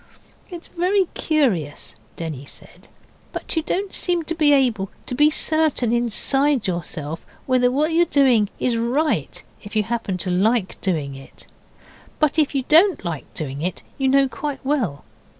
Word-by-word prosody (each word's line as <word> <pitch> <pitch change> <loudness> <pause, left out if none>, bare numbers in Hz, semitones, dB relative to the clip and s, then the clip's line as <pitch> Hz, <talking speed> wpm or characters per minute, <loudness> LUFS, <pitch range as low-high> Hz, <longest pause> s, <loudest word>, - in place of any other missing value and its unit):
'It's 350 -2 -9
very 370 +3 +1
curious,' 215 - 0 0.2
Denny 155 -5 -5
said, - - -12 0.4
'but - - -5
you 320 - +2
don't 380 +5 -2
seem 350 -2 +1
to 320 - -2
be 310 -3 +3
able 240 -9 +2 0.2
to - - -4
be 295 +4 +5
certain 310 -6 +1
inside 255 +3 +1
yourself 165 -4 -4 0.2
whether 255 -1 +3
what 300 +5 0
you're 345 +1 +4
doing 250 -7 +3
is 240 -2 +1
right 260 +7 -1 0.2
if 205 +1 -10
you 215 - +3
happen 225 -4 -3
to 180 0 -2
like 200 +3 +1
doing 155 -8 -1
it, 135 0 -13 0.7
but 305 +1 +2
if 295 -2 +1
you 270 - +1
don't 335 - +5
like 160 -4 -5
doing 140 -2 -3
it 180 +1 -3 0.2
you 270 - +1
know 275 +1 +4
quite 275 0 -5
well. 240 - -1
250 Hz, 160 wpm, -22 LUFS, 190-305 Hz, 0.7 s, be